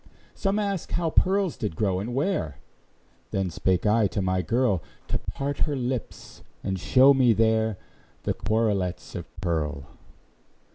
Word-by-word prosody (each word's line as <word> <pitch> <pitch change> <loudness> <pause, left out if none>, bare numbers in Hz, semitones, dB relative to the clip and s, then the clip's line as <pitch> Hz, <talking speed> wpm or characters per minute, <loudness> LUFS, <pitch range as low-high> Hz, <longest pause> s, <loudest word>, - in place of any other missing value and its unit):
Some 195 +1 0
asked 200 -4 -2
how 165 -2 0
pearls 190 0 +2
did 105 -9 -3
grow, 95 0 0
and 120 +5 -4
where; 135 - -1 0.7
Then 95 -2 -1
spake 90 +3 0
I 105 0 +4
to 100 - -3
my 95 -1 +1
girl, 115 -2 +1 0.3
To - - -1
part 140 +1 -4
her 150 -2 +1
lips 125 -2 -4 0.2
and 95 -1 -2
show 130 +11 +6
me 130 -4 +4
there 110 -1 +2 0.5
The - - 0
quarelets 100 -5 -1
of 85 -2 -6
pearl. 75 -5 -1
110 Hz, 145 wpm, -26 LUFS, 95-135 Hz, 0.7 s, show